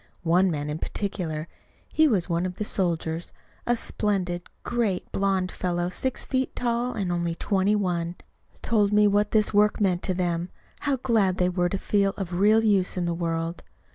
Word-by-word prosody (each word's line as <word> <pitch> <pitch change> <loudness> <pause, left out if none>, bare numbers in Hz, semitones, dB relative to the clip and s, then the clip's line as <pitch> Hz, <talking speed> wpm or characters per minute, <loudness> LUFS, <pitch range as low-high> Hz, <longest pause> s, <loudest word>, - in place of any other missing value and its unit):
One 180 +3 +3
man 150 -3 -2
in 150 +1 -3
particular 170 -7 -3 0.5
he 315 0 +5
was 200 - +1
one 170 +1 0
of 180 - -7
the 210 - -3
soldiers, 170 -4 -1 0.4
a 240 - +3
splendid, 190 -6 -1 0.2
great, 225 -6 -1
blond 190 -2 0
fellow 175 -1 -1
six 260 +8 -2
feet 260 0 -1
tall, 240 +1 -1
and 195 -4 -2
only 170 -1 -1
twenty 195 +3 +1
one 175 -4 -1 0.5
told 210 -3 +2
me 210 0 +5
what 205 +1 +2
this 215 -1 +2
work 210 +1 +3
meant 185 -4 +2
to 185 - -1
them; 175 -1 -1 0.3
how 285 -2 0
glad 220 -7 +1
they 180 0 +2
were 175 -1 0
to 195 - -2
feel 200 0 +1
of 185 -3 -4
real 210 +5 +4
use 195 -4 +2
in 180 - 0
the 170 - 0
world. 165 0 -2
190 Hz, 180 wpm, -26 LUFS, 175-210 Hz, 0.5 s, he